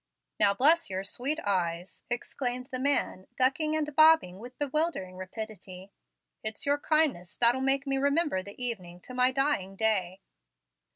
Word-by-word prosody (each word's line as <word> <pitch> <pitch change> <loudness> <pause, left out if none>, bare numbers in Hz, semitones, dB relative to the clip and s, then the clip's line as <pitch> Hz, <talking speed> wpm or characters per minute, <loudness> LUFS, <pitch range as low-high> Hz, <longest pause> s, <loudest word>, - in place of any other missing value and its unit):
"Now 200 0 +3
bless 310 +6 +5
your 190 0 -4
sweet 270 +10 -1
eyes!" 180 -2 -3
exclaimed 250 +1 -2
the 255 - -2
man, 260 -8 0
ducking 290 +4 +2
and 300 -2 -3
bobbing 310 - +5
with 245 +3 -11
bewildering 290 - -2
rapidity; 190 -1 -9 0.5
"it's 215 -1 -4
your 285 0 +1
kindness 295 - 0
that'll 245 +2 +4
make 270 +1 +1
me 270 -1 -1
remember 285 - +1
the 200 +4 -11
evening 185 -8 -3
to 255 - -12
my 250 +1 +3
dying 260 -8 -1
day." 195 -3 -1
245 Hz, 150 wpm, -28 LUFS, 190-285 Hz, 0.5 s, bless